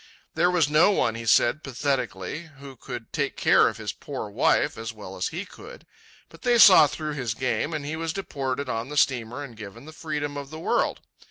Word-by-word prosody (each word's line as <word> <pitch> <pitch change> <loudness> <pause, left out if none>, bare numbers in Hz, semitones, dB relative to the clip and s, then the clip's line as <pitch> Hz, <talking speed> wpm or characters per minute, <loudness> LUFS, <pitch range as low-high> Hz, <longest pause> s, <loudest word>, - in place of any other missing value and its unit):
There 175 - +2
was 175 -5 +2
no 155 +6 +5
one, 195 - +1
he 115 0 -7
said 120 +7 +3
pathetically, 135 - -3
who 140 -1 -11
could 120 -1 -9
take - - -2
care - - +5
of - - -3
his - - -5
poor - - -7
wife - - +2
as 115 0 -5
well 100 -4 -10
as 90 - -2
he 175 +5 -5
could. 450 - -13 0.4
But - - -17
they 245 -2 +3
saw 185 -8 +9
through 155 +1 -5
his 125 -6 -3
game, 130 +4 -1
and 155 -3 -4
he 155 +2 -3
was 165 0 -3
deported 140 -7 -4
on 115 +1 -3
the 150 - -5
steamer 125 -1 +1
and 125 -5 -10
given 105 +3 -10
the 155 - -11
freedom 145 -2 -4
of 140 -1 -7
the 155 - -8
world. 160 - 0
140 Hz, 210 wpm, -25 LUFS, 120-155 Hz, 0.4 s, saw